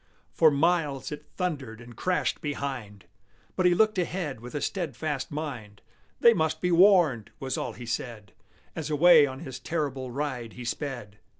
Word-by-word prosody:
For 160 - +6
miles 150 -2 +1
it 150 0 -8
thundered 140 - -3
and 120 0 -12
crashed 180 +8 -1
behind, 135 - -5 0.5
But 185 - +3
he 175 - +4
looked 215 0 +3
ahead 170 -7 -2
with 125 +5 -10
a - - 0
steadfast 155 -5 -3
mind: 125 -9 -6 0.4
"They 235 - +8
must 160 -6 0
be 180 - 0
warned!" 170 - +5
was 130 -2 -3
all - - -3
he 125 - -9
said, 115 -3 -5 0.4
As 160 -1 -4
away 155 0 +6
on 130 +1 -7
his 130 -5 -7
terrible 140 -6 -3
ride 125 -4 -4
he 125 - -8
sped. 120 -6 -5
145 Hz, 165 wpm, -27 LUFS, 125-165 Hz, 0.5 s, They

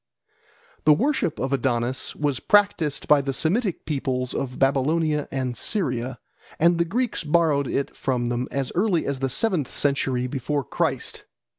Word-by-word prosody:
The 155 - +8
worship 265 - 0
of 135 +2 -1
Adonis 125 -1 -1
was 145 -4 -1
practised 200 -8 +2
by 150 -1 +5
the 135 0 -3
Semitic 190 - 0
peoples 130 -4 -2
of 130 -2 -3
Babylonia 150 +3 +1
and 130 -2 -2
Syria, 130 - -1 0.4
and 170 +1 +3
the 170 - +3
Greeks 235 +3 -1
borrowed 150 -3 +2
it 140 - -2
from 125 -2 -1
them 120 +1 -1
as 135 -2 -2
early 180 -2 +1
as 140 -1 -2
the 135 0 -1
seventh 180 - +1
century 135 -3 0
before 140 +2 -2
Christ. - - -2
140 Hz, 150 wpm, -24 LUFS, 130-165 Hz, 0.4 s, The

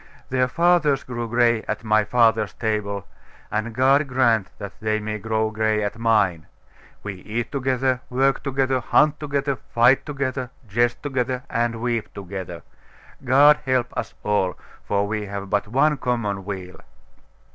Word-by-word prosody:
Their 130 0 +2
fathers 165 -2 +2
grew 120 -2 -4
gray 120 -1 +3
at 105 +1 -3
my 110 -1 +3
father's 110 -1 +2
table, 105 -3 -2 0.5
and 110 +1 -2
God 135 +3 +4
grant 120 -6 +2
that 100 -2 -7
they 110 0 0
may 110 0 -4
grow 110 +1 -1
gray 110 -1 0
at 105 +2 -4
mine! 105 -8 +2 0.6
We 105 -2 -5
eat 110 +6 -4
together, 130 -2 0
work 135 +2 +1
together, 135 -1 0
hunt 150 +5 +3
together, 140 -2 -1
fight 120 +4 +3
together, 135 -3 -3 0.2
jest 120 +4 0
together, 130 -2 -2
and 115 0 -1
weep 120 -3 -1
together. 95 -3 -7 0.6
God 145 +4 +6
help 130 -2 0
us - - -4
all! 100 -3 0 0.3
for 100 0 +1
we 105 0 -3
have 100 0 -6
but 105 0 +1
one 140 +6 +2
common 105 -7 -2
weal. 95 -2 -6
115 Hz, 145 wpm, -23 LUFS, 105-130 Hz, 0.6 s, God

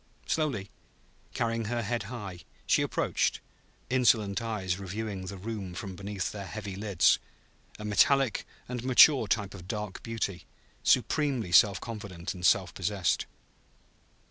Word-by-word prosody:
Slowly, 135 -11 -1 0.6
carrying 115 -1 0
her 120 +2 -1
head 120 +3 -1
high, 100 -8 -6 0.3
she - - +3
approached, - - 0 0.5
insolent 115 -5 +3
eyes 100 -5 -2
reviewing 100 0 -5
the 100 +1 -6
room 100 -3 -5
from 95 0 -6
beneath 100 0 -4
their 100 -2 -7
heavy 105 -2 -6
lids; 100 -3 +3 0.6
a 105 - -7
metallic 130 +3 +3 0.2
and 125 -1 -4
mature 130 -1 +7
type 100 -1 0
of 90 -2 -10
dark 105 -3 -4
beauty, 110 -5 -4 0.3
supremely 135 - +2
self 100 +1 +6
confident 100 -7 -6
and 90 -2 -10
self 95 +1 +3
possessed. 95 -2 0
105 Hz, 130 wpm, -29 LUFS, 95-115 Hz, 0.6 s, mature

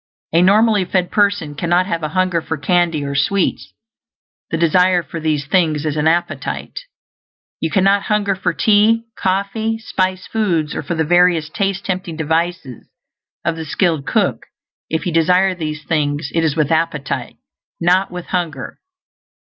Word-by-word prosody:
A 165 - +5
normally 210 +2 +4
fed 180 0 -1
person 200 -7 +1
cannot 175 +4 +1
have 170 -3 -2
a 155 - -2
hunger 185 0 0
for 160 - -4
candy 165 0 +1
or 140 0 -3
sweets; 185 +7 0 0.8
the 165 - -1
desire 175 +2 +3
for 165 +3 -7
these 155 -3 -1
things 155 -2 +1
is 155 -1 -1
an 150 +1 +1
appetite. 170 +2 -2 0.8
You 160 - -1
cannot 195 +3 +3
hunger 210 -2 +1
for 185 -1 -1
tea, 215 +4 +3
coffee, 200 +4 -1
spiced 185 -4 -2
foods, 170 -9 0
or - - -3
for 170 - -4
the 160 - +1
various 175 -1 +3
taste 195 +3 -2
tempting 185 -4 -3
devices 160 -5 -2 0.6
of 170 0 0
the 160 - -5
skilled 160 -3 0
cook; - - 0 0.4
if 160 -1 -2
you 175 - -2
desire 180 +3 +3
these 155 -3 -5
things, 145 -2 -1
it 165 - +1
is 155 -3 +1
with 155 -2 0
appetite, 160 -3 -1 0.4
not 180 +3 +2
with 180 0 -7
hunger. 165 -7 -4
175 Hz, 155 wpm, -18 LUFS, 155-190 Hz, 0.8 s, A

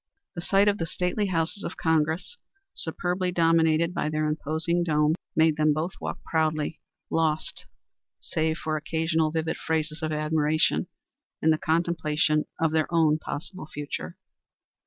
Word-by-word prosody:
The 170 - -5
sight 195 +3 +3
of 205 0 +2
the 165 - -1
stately 180 +5 -1
houses 170 +2 -1
of - - -5
Congress, 160 - 0 0.3
superbly 180 +2 -1
dominated 165 0 +3
by 160 - -1
their 155 0 0
imposing 160 +3 0
dome, 150 -2 +2 0.2
made 160 -1 +4
them 155 -1 +4
both 160 +4 -2
walk - - -5
proudly, 155 -1 0 0.3
lost, 160 -1 0 0.5
save 160 0 -1
for 155 0 -2
occasional 160 +1 0
vivid 160 0 -2
phrases 155 0 -2
of 155 0 -1
admiration, 155 0 +1 0.5
in 160 - +3
the 155 - +2
contemplation 155 -2 +1
of 165 -1 +2
their 160 0 +1
own 160 -2 +3
possible 155 +3 -6
future. 145 - -6
160 Hz, 140 wpm, -26 LUFS, 155-170 Hz, 0.5 s, made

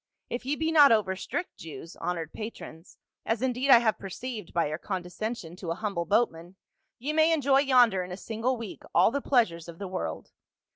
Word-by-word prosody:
If 250 +1 -4
ye 290 - +1
be 320 +1 -1
not 295 -4 +7
over 210 -4 +2
strict 345 - -5
Jews, 165 +1 -9
honored 165 -3 -3
patrons 205 -6 -9
— - - -64
as 225 +2 -1
indeed 260 +1 0
I 265 - +10
have 225 -2 +1
perceived 210 0 -6
by 170 - +1
your 155 +2 -4
condescension 185 0 -5
to 180 -3 -6
a 165 - -1
humble 195 -4 -3
boatman, 180 -3 0 0.4
ye 285 +6 -3
may 315 +1 +4
enjoy 280 -4 +3
yonder 245 -9 +4
in 180 - -9
a 180 - -5
single 230 +5 -2
week 225 -4 -8
all - - +5
the 280 +2 -2
pleasures 180 - +1
of 170 -1 -10
the 200 - -5
world. 185 0 -5
215 Hz, 200 wpm, -28 LUFS, 180-255 Hz, 0.4 s, I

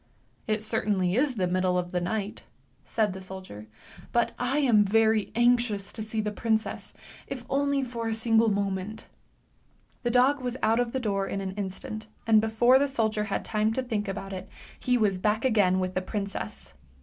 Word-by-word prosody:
" - - -38
It 215 -1 0
certainly 205 -5 0
is 265 +1 +2
the 190 -4 +1
middle 180 0 +1
of 175 0 -2
the 180 - -1
night," 200 +3 -3 0.4
said 215 -4 0
the 190 - -8
soldier, 185 - -9 0.2
" - - -18
but 235 0 +2
I 245 +3 0
am 240 -8 +5
very 220 +1 +2
anxious 240 -4 +2
to 220 - -4
see 220 0 -2
the 210 0 -2
princess, 220 +1 -2 0.3
if 255 -3 -6
only 280 0 +1
for 235 -2 -4
a 225 - 0
single 225 0 +3
moment." 200 +1 -2 1.0
The 240 - 0
dog 255 +4 +4
was 250 0 -3
out 225 +2 +3
of 245 -1 0
the 265 - -1
door 200 -5 -1
in 195 - -3
an 190 -1 -3
instant, 205 +2 -6 0.2
and 220 -1 +5
before 240 +4 +4
the 285 - +2
soldier 220 -5 0
had 200 - -3
time 215 0 +1
to 260 - -1
think 220 -4 -2
about 195 0 -5
it, 185 0 -7 0.3
he 250 -1 +2
was 200 -5 +1
back 215 +4 +1
again 200 -7 +3
with 185 0 -2
the 185 - 0
princess. 185 - -5
215 Hz, 195 wpm, -27 LUFS, 195-240 Hz, 1.0 s, am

